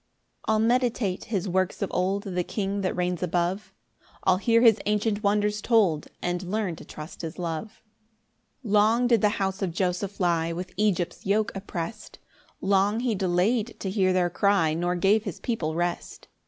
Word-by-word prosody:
2 220 - +3
I'll - - +3
meditate 230 -4 +1
his 200 -4 -2
works 185 +2 0
of 195 - -3
old; 190 +2 0
The 180 -2 -2
King 200 +1 -2
that 185 - -1
reigns 180 -1 -1
above; 180 +3 -1 0.5
I'll 185 -1 +4
hear 230 +4 +3
his 225 -3 +6
ancient 210 0 0
wonders 210 0 +1
told, 200 -11 +2 0.2
And 175 0 -1
learn 190 -1 -2
to - - -10
trust 155 +2 -9
his 165 -1 -6
love. 175 +4 -5 0.8
3 215 - -5
Long 220 +4 +4
did 235 -4 +3
the 210 - +4
house 190 0 -2
of 190 -3 -1
Joseph 185 +3 -2
lie 170 -2 +1
With 180 +2 -6
Egypt's 190 -3 -1
yoke 210 +2 +2
opprest: 195 +2 -6 0.4
Long 200 +3 +2
he 245 -2 0
delay'd 200 +5 0
to 190 - -3
hear 190 -2 +2
their 180 -1 +1
cry, 200 -6 +2
Nor 175 +2 0
gave 200 +4 +3
his 195 -5 -5
people 165 -10 -2
rest. 175 0 -3
195 Hz, 175 wpm, -26 LUFS, 180-210 Hz, 0.8 s, his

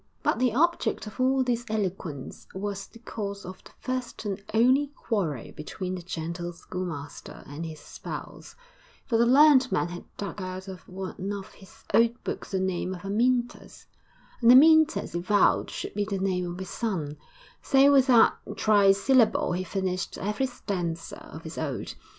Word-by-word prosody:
But - - +1
the 250 -1 +3
object 340 -2 +1
of 210 +4 -10
all 260 +1 +3
this 240 -1 -1
eloquence 185 -9 -4
was 200 0 -4
the - - -16
cause 205 -3 -6
of 185 +1 -9
the - - -14
first 255 -3 -4
and 200 -1 -3
only 255 +6 +4
quarrel 170 - -2
between 180 +4 -5
the 185 - -5
gentle 170 0 -5
schoolmaster 165 -4 -7
and 145 +4 -7
his 155 -2 -9
spouse; - - -8 0.5
for 230 - +1
the 235 - +4
learned 265 -1 +6
man 180 -2 +1
had 175 0 -8
dug 200 0 -5
out 185 +1 -6
of 185 -1 -10
one 190 +1 -5
of 200 -2 -6
his 190 - -17
old 235 +1 +3
books - - -5
the 190 - -1
name 185 0 -1
of 175 - -11
Amyntas, 240 +4 -1 0.6
and 235 0 +7
Amyntas 315 - +6
he 175 - -1
vowed 200 +3 +3
should - - -6
be 205 - 0
the 200 -1 -2
name 185 -2 -1
of 175 - -7
his 190 -1 -7
son; 165 -11 -3 0.4
so 275 0 +5
with 270 -2 +5
that 240 -4 +6 0.2
trisyllable 210 0 +4
he 185 - -2
finished 185 -1 -3
every 210 +7 -1
stanza 175 -9 -4
of 160 - -9
his 160 0 -7
ode. 145 -5 -4
195 Hz, 170 wpm, -27 LUFS, 180-240 Hz, 0.6 s, and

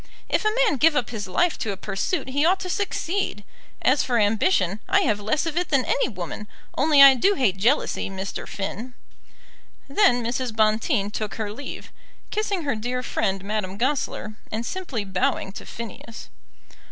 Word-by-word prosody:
If - - 0
a 430 +1 +2
man 305 - +1
give 315 +4 +4
up 245 -5 0
his 210 -5 -5
life 340 - +1
to 215 - -2
a 195 - -5
pursuit 235 - -2
he 285 +3 +1
ought 365 +4 +3
to 365 - -3
succeed. 385 - -2 0.4
As 265 +2 +4
for 245 -2 0
ambition, 205 - +2
I 395 +1 +4
have 215 - +1
less 215 +10 0
of 330 0 -3
it 355 - 0
than 275 -4 +2
any - - +1
woman. 210 - -6 0.3
Only 290 -1 +6
I 275 -1 +10
do 390 - +3
hate 210 - +1
jealousy, 235 +4 +1
Mr. 195 0 -5
Finn." 220 +5 -5 0.9
Then 275 - +3
Mrs. 240 -1 -2
Bonteen 215 0 +2
took 210 -4 -4
her 210 -2 -3
leave, 275 +5 -8 0.4
kissing 410 -4 -1
her 280 -5 0
dear 245 +3 -3
friend, 195 -5 -1
Madame 200 -2 -3
Goesler, 250 -3 -1 0.2
and 225 +2 -3
simply 285 - -4
bowing 190 0 -1
to - - -10
Phineas. 230 0 -8
240 Hz, 175 wpm, -24 LUFS, 210-310 Hz, 0.9 s, I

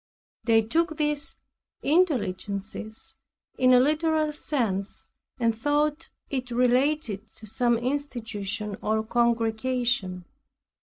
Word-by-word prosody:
They 225 -2 +5
took 320 +7 0
these 295 -1 +1 0.5
intelligences 220 - -1 0.4
in 255 -1 +5
a 250 - +8
literal 310 +2 +2
sense 220 -10 -1 0.3
and 230 -2 +2
thought 295 +5 0 0.2
it 255 -2 -2
related 250 -2 +1
to 220 - -10
some 240 +2 +1
institution 225 -6 -3
or 220 +1 +1
congregation. 230 -4 0
240 Hz, 95 wpm, -26 LUFS, 220-290 Hz, 0.5 s, a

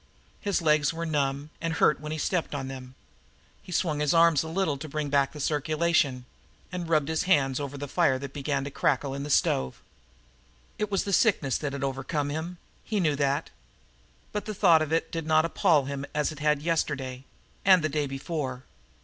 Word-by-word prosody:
His 200 -4 -1
legs 150 -2 +3
were 165 0 -4
numb, 145 -1 -1
and 165 0 -1
hurt 150 - +3
when 150 +1 -6
he 155 - -2
stepped 165 -1 -1
on 135 -2 -3
them. 130 -1 -8 0.7
He - - -12
swung 160 -4 0
his 150 +1 +2
arms 165 -3 +5
a 160 - -5
little 165 -2 0
to 155 +2 -7
bring 150 0 -3
back 140 +1 +1
circulation, 150 -3 +1 0.5
and 175 -2 -4
rubbed 155 -3 +2
his 160 +4 -1
hands 135 -7 +2
over 145 0 -5
the 145 +1 -5
fire 145 -3 +2
that 135 0 -7
began 140 -1 -1
to 140 - -5
crackle 140 0 0
in 140 - -4
the 145 - -5
stove. 65 - +1 1.0
It 210 - -1
was 195 -2 0
the 200 - -3
sickness 165 - +2
that 145 -2 -3
had 140 -1 -4
overcome 140 +2 -2
him 165 +4 -4 0.3
he 215 -2 -1
knew 155 -5 +2
that. 140 +2 0 0.8
But 210 - -3
the 215 - -5
thought 170 -5 +5
of 155 -1 -2
it 165 0 0
did 165 -2 -4
not 155 0 +4
appall 165 -4 +3
him 140 0 -4
as 150 0 +1
it 155 - -9
had 150 -1 +1
yesterday, 140 -6 -1 0.4
and 185 -4 +6
the - - +2
day 150 -1 -1
before. 135 -2 -4
150 Hz, 200 wpm, -27 LUFS, 140-165 Hz, 1.0 s, and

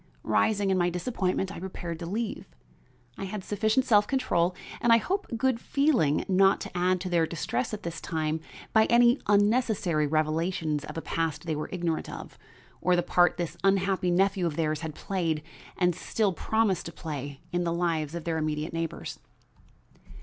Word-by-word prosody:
Rising 205 -2 +2
in 190 - +2
my 175 0 +3
disappointment, 185 0 -1
I - - -7
prepared 175 -3 -6
to 170 - -5
leave. 210 0 -3 0.7
I 195 - -3
had 195 0 -5
sufficient 220 +6 +1
self 210 -4 +4
control 185 -10 +1 0.3
and 235 - +3
I 230 - +8
hope 385 - -2
good 255 0 +1
feeling 255 - +2
not 195 +1 +4
to - - -7
add 180 +1 +2
to 185 - -3
their 170 -2 +2
distress 130 -7 -2
at 215 - -5
this 165 -1 -5
time 160 -1 -1 0.3
by 220 -1 +6
any 240 +2 +5
unnecessary 205 -7 +2
revelations 155 0 0
of - - -8
a 165 - -4
past 165 0 -2
they 160 -2 -1
were 150 - -4
ignorant 170 -3 -2
of, - - -9 0.4
or 180 +1 +3
the 175 - +1
part 175 -1 +3
this 170 -1 -3
unhappy 195 -1 +2
nephew 190 0 +2
of 155 - -3
theirs 155 -1 0
had 160 -2 -5
played 165 -6 -2 0.3
and 180 -1 +3
still 200 +3 0
promised 215 -1 0
to - - -6
play 145 -4 -6
in 175 +1 0
the 170 - 0
lives 165 -3 -1
of 170 - -4
their 160 -1 -1
immediate 155 +1 -2
neighbors. 165 -1 -4
175 Hz, 180 wpm, -28 LUFS, 160-205 Hz, 0.7 s, I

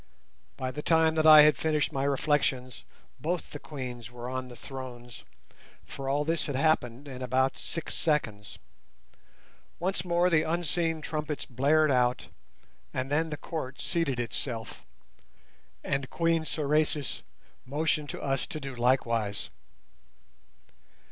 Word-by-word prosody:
By 130 0 -2
the 150 - -5
time 160 0 +4
that 160 0 +3
I 155 -1 +11
had 150 0 +5
finished 155 -2 +1
my 135 0 0
reflections 135 -3 0 0.4
both 175 +2 -2
the 145 - -6
Queens 125 -6 -7
were 120 0 -8
on 130 0 -3
the 125 - -11
thrones, 125 -3 -9 0.6
for 135 -1 -5
all 145 +2 +1
this 165 +1 0
had 145 - -2
happened 135 -3 +1
in 130 -2 -7
about 130 +1 +1
six 165 - -4
seconds. 110 -10 -1 1.2
Once 180 0 -1
more 175 0 +2
the 160 -2 +5
unseen 165 0 0
trumpets 150 -1 -3
blared 145 +4 +3
out, 125 -1 +1 0.6
and 130 +2 -3
then 160 +2 +1
the 150 - -4
Court 145 -5 -5
seated 165 -8 -1
itself, 115 -1 -4 1.0
and 135 -2 -1
Queen 165 -1 +1
Sorais 150 -1 0 0.4
motioned 150 +1 0
to - - -5
us 135 -2 0
to 155 - -5
do 135 -3 -6
likewise. 115 -4 0
145 Hz, 135 wpm, -29 LUFS, 130-155 Hz, 1.2 s, I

